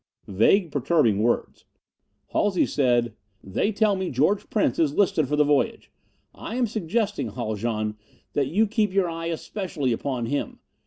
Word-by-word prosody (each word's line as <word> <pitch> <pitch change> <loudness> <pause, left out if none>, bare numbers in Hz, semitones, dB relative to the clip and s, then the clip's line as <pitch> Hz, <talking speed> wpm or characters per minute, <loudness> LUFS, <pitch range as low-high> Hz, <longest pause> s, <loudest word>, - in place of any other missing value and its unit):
Vague, 155 - +3
perturbing 135 -7 +2
words! 120 +2 -1 0.6
Halsey 205 -3 +2
said, 120 -4 +1 0.3
"They 95 - -1
tell 210 -1 +2
me 190 -1 -2
George 155 +11 +1
Prince 210 - +1
is 155 -3 +2
listed 165 -7 +2
for 150 - 0
the 150 - +4
voyage. 145 -1 0 0.4
I 225 - -7
am 250 -1 +2
suggesting, 210 0 -1
Haljan, 110 -2 -3 0.4
that 140 -2 +1
you 200 +10 +2
keep 210 -1 0
your 195 -2 +2
eye 165 0 -4
especially 170 - -3
upon 125 0 -3
him. 140 +5 -3
155 Hz, 150 wpm, -25 LUFS, 120-200 Hz, 0.6 s, the